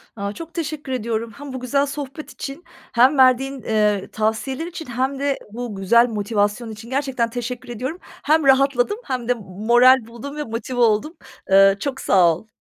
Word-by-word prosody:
A, 200 -1 -4
çok 330 +4 -9
teşekkür 300 -4 -4
ediyorum 230 -2 -2
hem 285 -2 -8
bu 260 - -4
güzel 275 +3 +1
sohbet 285 +1 -7
için 275 +5 -7 0.3
hem 260 +4 +4
verdiğin, 260 +1 +3
eee, 210 -3 +1
tavsiyeler 225 +8 -2
için 330 -2 -7
hem 260 +3 -2
de 280 -1 0
bu 235 -1 -5
güzel 235 +5 +4
motivasyon 210 +1 -1
için 220 +2 -10
gerçekten 260 -3 -1
teşekkür 245 +1 -5
ediyorum. 255 +8 -4
Hem 310 0 0
rahatladım 275 - +3
hem 250 -3 -3
de 245 - +3
m 240 - -11
moral 235 +5 +4
buldum 235 +5 -8
ve 300 - -2
motive 245 +2 -5
oldum. 235 +9 +2 0.3
Eee, 195 0 +6
çok 270 +1 -4
sağ 175 -4 +4
ol. 220 +6 -13
245 Hz, 175 wpm, -21 LUFS, 220-275 Hz, 0.3 s, Eee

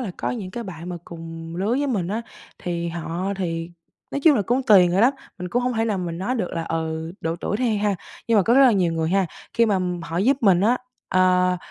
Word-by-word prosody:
là 225 -7 -3
có - - -2
những 205 -7 -5
cái 235 +5 -5
bạn 175 -3 -8
mà 180 - -4
cùng 165 0 -8
lứa 195 +4 -1
với 280 +4 +1
mình 200 -10 -1
á, 220 +4 -2 0.4
thì 170 -1 -3
họ 170 +3 -3
thì 165 -2 -3 0.4
nói 280 - -2
chung 300 0 +6
là 205 - +1
cũng 245 +7 0
tùy 195 -7 +7
người 180 +3 +1
lắm, 250 +5 +5 0.3
mình 180 0 -5
cũng 245 +5 0
hông 250 0 0
thể 225 - +1
nào 210 -4 -1
mình 170 -2 -4
nói 220 +7 -1
được 205 -8 -2
là, 165 -1 -2
ừ, 160 0 -3
độ 165 +1 -2
tuổi 205 - -2
đi 235 -3 +1
ha, 205 -1 +1 0.3
nhưng 230 - +4
mà 195 - +5
có 235 +6 +3
rất 275 - +6
là 250 -3 +7
nhiều 180 -4 +2
người 160 -1 -1
ha, 195 -1 +2 0.3
khi 230 0 +4
mà 200 -3 +2 0.2
họ 165 +1 -5
giúp 260 +8 +3
mình 190 -5 +4
á, 230 +5 +3 0.3
ờ, 180 0 +3
185 Hz, 255 wpm, -23 LUFS, 170-225 Hz, 0.4 s, tùy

